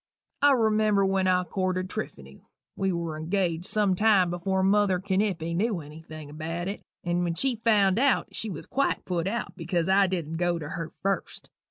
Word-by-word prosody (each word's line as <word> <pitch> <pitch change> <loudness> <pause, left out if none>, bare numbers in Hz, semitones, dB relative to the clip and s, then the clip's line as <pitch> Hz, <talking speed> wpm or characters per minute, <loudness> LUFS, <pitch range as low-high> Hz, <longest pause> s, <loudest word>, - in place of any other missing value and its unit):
I 285 0 +6
remember 215 -4 +3
when 190 -1 +1
I 180 0 +3
courted 185 0 -2
Trypheny, 70 - -7 0.3
we 195 0 0
were 165 -3 -3
engaged 175 0 -1
some 210 -3 +2
time 195 -3 +4
before 190 +2 -1
mother 195 -1 +3
Kenipe 190 -4 -1
knew 205 0 0
anything 155 0 -10
about 165 +3 -4
it, 200 - -4 0.2
and 175 0 0
when 170 -1 -1
she 260 +4 +1
found 205 -3 +4
it - - +2
out 275 -2 +2
she 220 - -4
was 170 -6 -6
quite 275 +2 -1
put 175 -1 -1
out 235 +3 -3
because 170 -1 -1
I 195 +1 +4
dident 165 -3 -3
go 175 0 +1
to 150 -3 -6
her 165 -1 -5
first. 195 0 -3
185 Hz, 185 wpm, -27 LUFS, 170-200 Hz, 0.3 s, I